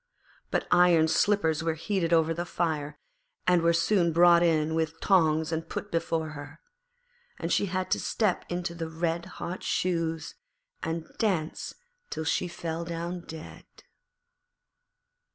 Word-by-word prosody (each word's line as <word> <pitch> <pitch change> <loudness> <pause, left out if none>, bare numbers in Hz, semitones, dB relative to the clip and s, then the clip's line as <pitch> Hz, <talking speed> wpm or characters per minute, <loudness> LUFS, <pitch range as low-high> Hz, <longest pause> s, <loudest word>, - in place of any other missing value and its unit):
But - - 0
iron 175 -2 +5
slippers 160 -2 +2
were 165 -1 0
heated 175 0 -1
over 165 -1 +4
the 170 +1 -3
fire, 160 -4 -2 0.5
and 180 -1 +4
were 170 0 +4
soon 170 +1 +2
brought 170 +1 +6
in 160 -2 +2
with 160 0 -1
tongs 160 -4 +3
and 165 0 -3
put 205 - -5
before 165 -1 -1
her. 145 -1 -9 0.8
And - - -2
she 200 - +2
had 185 0 -2
to - - +2
step 210 -5 0
into 175 -1 -3
the 165 -1 -5
red 165 +1 -2
hot 180 +2 -5
shoes 165 -3 -1 0.5
and 165 0 -3
dance 180 -8 -1 0.3
till 160 - -3
she 175 - 0
fell 170 -1 -4
down 170 +1 -5
dead. 160 -1 -9
165 Hz, 140 wpm, -28 LUFS, 160-175 Hz, 0.8 s, brought